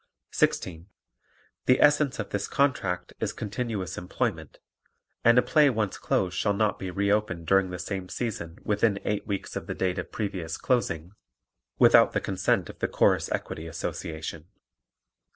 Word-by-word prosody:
16. 85 Hz, -1 st, 0 dB, 0.8 s
The 125 Hz, -, +5 dB
essence 145 Hz, -1 st, +4 dB
of -, -, -5 dB
this 100 Hz, 0 st, -2 dB
contract 95 Hz, -11 st, 0 dB
is -, -, -1 dB
continuous 105 Hz, -3 st, -4 dB
employment 90 Hz, -, -3 dB, 0.7 s
and 120 Hz, +1 st, +6 dB
a 125 Hz, -, +6 dB
play 150 Hz, -3 st, +4 dB
once 110 Hz, -5 st, -1 dB
closed 90 Hz, -1 st, 0 dB
shall 100 Hz, +2 st, +1 dB
not 105 Hz, 0 st, +1 dB
be 95 Hz, -, -4 dB
re 100 Hz, +3 st, 0 dB
opened 100 Hz, -5 st, 0 dB
during 95 Hz, +2 st, +3 dB
the 90 Hz, -, -5 dB
same 95 Hz, -1 st, -5 dB
season 95 Hz, -9 st, -4 dB
within 105 Hz, -1 st, +1 dB
eight 105 Hz, 0 st, -1 dB
weeks 100 Hz, -2 st, -4 dB
of -, -, -5 dB
the -, -, -4 dB
date 95 Hz, 0 st, -1 dB
of 90 Hz, -, -6 dB
previous 90 Hz, -6 st, -3 dB
closing, 90 Hz, -9 st, -1 dB, 0.7 s
without -, -, +6 dB
the -, -, +2 dB
consent -, -, 0 dB
of -, -, -11 dB
the -, -, 0 dB
Chorus -, -, +2 dB
Equity 80 Hz, +1 st, -4 dB
Association. 80 Hz, -1 st, -5 dB
100 Hz, 155 wpm, -27 LUFS, 90-110 Hz, 0.8 s, and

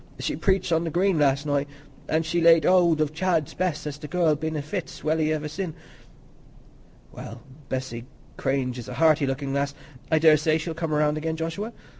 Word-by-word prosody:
"She -, -, -2 dB
preached 190 Hz, -3 st, +1 dB
on 165 Hz, 0 st, +2 dB
the 165 Hz, -, -2 dB
Green 180 Hz, +1 st, +1 dB
last 140 Hz, 0 st, +2 dB
night; 145 Hz, -1 st, 0 dB, 0.4 s
an' 160 Hz, +1 st, +2 dB
she's 165 Hz, +1 st, -1 dB
laid 165 Hz, -2 st, +6 dB
hold 170 Hz, -4 st, +4 dB
of 155 Hz, 0 st, 0 dB
Chad's 165 Hz, -3 st, 0 dB
Bess, 180 Hz, -5 st, -2 dB
as 145 Hz, -1 st, -5 dB
the 150 Hz, -, -7 dB
girl's 160 Hz, -3 st, +1 dB
been 160 Hz, 0 st, -2 dB
i' -, -, -2 dB
fits 165 Hz, +4 st, -6 dB
welly 155 Hz, 0 st, +1 dB
iver 155 Hz, -1 st, -2 dB
sin'." 165 Hz, +1 st, -5 dB, 1.4 s
"Well, 115 Hz, +2 st, -9 dB, 0.3 s
Bessy 130 Hz, -3 st, -4 dB, 0.3 s
Cranage 130 Hz, -2 st, -1 dB
is 115 Hz, -, -8 dB
a -, -, -6 dB
hearty 155 Hz, -3 st, +3 dB
looking 135 Hz, +1 st, -3 dB
lass; 140 Hz, 0 st, -1 dB, 0.4 s
I 160 Hz, -, +5 dB
daresay 155 Hz, 0 st, +4 dB
she'll 160 Hz, +1 st, -4 dB
come 165 Hz, -1 st, -3 dB
round 150 Hz, 0 st, +1 dB
again, 160 Hz, +1 st, -2 dB
Joshua. 165 Hz, +8 st, -4 dB
155 Hz, 190 wpm, -25 LUFS, 145-165 Hz, 1.4 s, laid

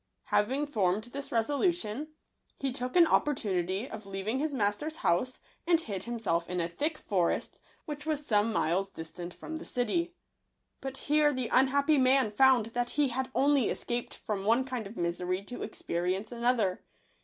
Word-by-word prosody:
Having 265 Hz, +8 st, +2 dB
formed 210 Hz, -7 st, +1 dB
this 275 Hz, +4 st, -7 dB
resolution, 285 Hz, -, 0 dB, 0.5 s
he 270 Hz, -1 st, -1 dB
took 250 Hz, 0 st, -3 dB
an 350 Hz, -2 st, +8 dB
op -, -, +4 dB
portunity 195 Hz, -5 st, -1 dB
of 215 Hz, -5 st, -8 dB
leaving 195 Hz, +6 st, -2 dB
his 305 Hz, +1 st, 0 dB
master's 260 Hz, +6 st, -1 dB
house, 250 Hz, +10 st, +1 dB, 0.3 s
and 340 Hz, -2 st, +5 dB
hid 200 Hz, -, -5 dB
himself 215 Hz, -8 st, -1 dB
in 180 Hz, 0 st, -1 dB
a 170 Hz, -, 0 dB
thick 300 Hz, -, -1 dB
forest, 180 Hz, -5 st, -1 dB, 0.3 s
which 295 Hz, -1 st, -6 dB
was 300 Hz, -1 st, -2 dB
some 215 Hz, -2 st, +2 dB
miles 195 Hz, -1 st, +1 dB
distant 175 Hz, 0 st, -7 dB
from 320 Hz, -, -7 dB
the -, -, -8 dB
city. 335 Hz, +9 st, -1 dB, 0.6 s
But 270 Hz, 0 st, -4 dB
here 300 Hz, 0 st, +3 dB
the 255 Hz, -4 st, -3 dB
un 265 Hz, +1 st, +5 dB
happy 280 Hz, +2 st, +3 dB
man 260 Hz, -3 st, +4 dB
found 255 Hz, 0 st, +5 dB
that 245 Hz, 0 st, 0 dB
he 290 Hz, -2 st, +3 dB
had 260 Hz, +2 st, -2 dB
only 280 Hz, -3 st, +3 dB
escaped 240 Hz, 0 st, -3 dB
from 205 Hz, -3 st, -3 dB
one 230 Hz, +5 st, +3 dB
kind 250 Hz, -5 st, -4 dB
of 210 Hz, -, -11 dB
misery 180 Hz, +2 st, -1 dB
to 245 Hz, +5 st, -8 dB
experience 185 Hz, +5 st, -2 dB
another. 235 Hz, -5 st, +1 dB
240 Hz, 170 wpm, -30 LUFS, 195-280 Hz, 0.6 s, an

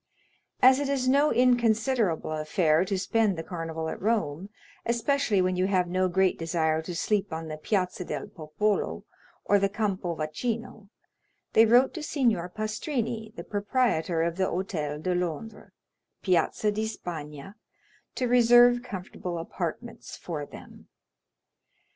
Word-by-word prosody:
As 260 Hz, +1 st, +7 dB
it 285 Hz, -1 st, -2 dB
is 265 Hz, -2 st, 0 dB
no 280 Hz, +3 st, +4 dB
inconsiderable 235 Hz, -7 st, +2 dB
affair 155 Hz, +1 st, +2 dB
to 195 Hz, 0 st, -1 dB
spend 210 Hz, 0 st, +1 dB
the 165 Hz, -, -4 dB
Carnival 165 Hz, -2 st, -5 dB
at -, -, -5 dB
Rome, 195 Hz, -5 st, -1 dB, 0.3 s
especially 235 Hz, -3 st, +1 dB
when 185 Hz, 0 st, 0 dB
you 185 Hz, +1 st, +1 dB
have 185 Hz, -2 st, +1 dB
no 185 Hz, +1 st, +1 dB
great 190 Hz, +1 st, +1 dB
desire 160 Hz, -1 st, 0 dB
to 175 Hz, +2 st, -6 dB
sleep 205 Hz, +3 st, 0 dB
on 160 Hz, 0 st, -5 dB
the 155 Hz, -, -5 dB
Piazza 180 Hz, +2 st, -1 dB
del 150 Hz, -5 st, -4 dB
Popolo, 180 Hz, +7 st, -2 dB, 0.4 s
or 205 Hz, -, +4 dB
the 195 Hz, 0 st, +1 dB
Campo 195 Hz, -5 st, -2 dB
Vaccino, 215 Hz, +7 st, -4 dB, 0.6 s
they 225 Hz, 0 st, +6 dB
wrote 245 Hz, +4 st, +5 dB
to 330 Hz, -, -6 dB
Signor 235 Hz, -, 0 dB
Pastrini, 220 Hz, -, -3 dB
the -, -, -7 dB
proprietor 205 Hz, -6 st, 0 dB
of 170 Hz, +1 st, -2 dB
the 190 Hz, -, +2 dB
Hôtel 155 Hz, -6 st, -3 dB
de 185 Hz, -, 0 dB
Londres, 180 Hz, +4 st, -4 dB, 0.5 s
Piazza 185 Hz, +3 st, +1 dB
di 215 Hz, +1 st, -2 dB
Spagna, 160 Hz, -5 st, -7 dB, 0.6 s
to 250 Hz, -, 0 dB
reserve 240 Hz, 0 st, +6 dB
comfortable 185 Hz, -6 st, -6 dB
apartments 175 Hz, +7 st, -6 dB
for 150 Hz, -4 st, -5 dB
them. -, -, -13 dB
195 Hz, 140 wpm, -27 LUFS, 165-230 Hz, 0.6 s, As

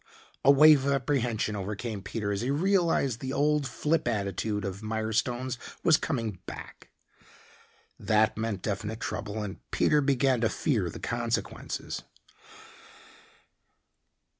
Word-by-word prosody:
A -, -, +5 dB
wave 140 Hz, -1 st, +7 dB
of 140 Hz, -, +3 dB
apprehension 120 Hz, -6 st, 0 dB
overcame 105 Hz, +2 st, -4 dB
Peter 105 Hz, +1 st, -3 dB
as 100 Hz, 0 st, -1 dB
he 125 Hz, -, -1 dB
realized 165 Hz, -, +2 dB
the 130 Hz, +2 st, -4 dB
old 150 Hz, -1 st, +2 dB
flip 150 Hz, +4 st, 0 dB
attitude 105 Hz, -1 st, -1 dB
of 95 Hz, +1 st, -5 dB
Mirestone's 110 Hz, +3 st, -1 dB, 0.2 s
was 160 Hz, -, +6 dB
coming 115 Hz, -, -3 dB
back. -, -, -9 dB, 1.1 s
That 110 Hz, 0 st, +2 dB
meant 110 Hz, -4 st, -3 dB
definite 110 Hz, +1 st, -3 dB
trouble, 110 Hz, -1 st, -4 dB
and 100 Hz, -1 st, -5 dB
Peter 150 Hz, -1 st, +3 dB
began 135 Hz, -3 st, +2 dB
to 115 Hz, -, +3 dB
fear 110 Hz, -, 0 dB
the -, -, -8 dB
consequences. 120 Hz, -1 st, -3 dB
115 Hz, 120 wpm, -28 LUFS, 105-140 Hz, 1.1 s, wave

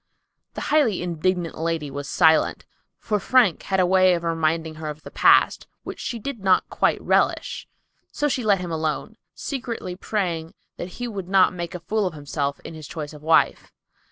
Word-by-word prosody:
The -, -, -4 dB
highly 235 Hz, -, +3 dB
indignant 175 Hz, 0 st, -1 dB
lady 165 Hz, -3 st, -2 dB
was 140 Hz, +1 st, -6 dB
silent, 160 Hz, -2 st, +3 dB, 0.3 s
for 210 Hz, -2 st, -1 dB
Frank 235 Hz, -3 st, +3 dB
had 190 Hz, -1 st, -1 dB
a 185 Hz, -, +4 dB
way 185 Hz, 0 st, +4 dB
of 170 Hz, -, -4 dB
reminding 165 Hz, -1 st, 0 dB
her 155 Hz, -, -4 dB
of 150 Hz, +1 st, -8 dB
the -, -, -10 dB
past, -, -, +4 dB, 0.2 s
which -, -, -7 dB
she 240 Hz, -, -4 dB
did 245 Hz, +2 st, -5 dB
not 190 Hz, -1 st, +3 dB
quite -, -, +1 dB
relish; -, -, 0 dB, 0.4 s
so 295 Hz, -, 0 dB
she 255 Hz, -3 st, -1 dB
let 200 Hz, -4 st, +3 dB
him 175 Hz, -2 st, -5 dB
alone, 160 Hz, +6 st, -2 dB, 0.2 s
secretly 240 Hz, -9 st, -5 dB
praying 175 Hz, -5 st, -3 dB, 0.2 s
that 175 Hz, +1 st, -6 dB
he 245 Hz, -, -3 dB
would 195 Hz, -5 st, -6 dB
not 190 Hz, -1 st, +4 dB
make 175 Hz, -1 st, -5 dB
a -, -, -4 dB
fool 205 Hz, +4 st, -1 dB
of 175 Hz, -, -6 dB
himself 145 Hz, -1 st, -3 dB
in -, -, -9 dB
his 155 Hz, -3 st, -9 dB
choice 155 Hz, -2 st, -6 dB
of 150 Hz, -, -12 dB
a -, -, -15 dB
wife. 160 Hz, -, +3 dB
175 Hz, 190 wpm, -23 LUFS, 160-200 Hz, 0.4 s, a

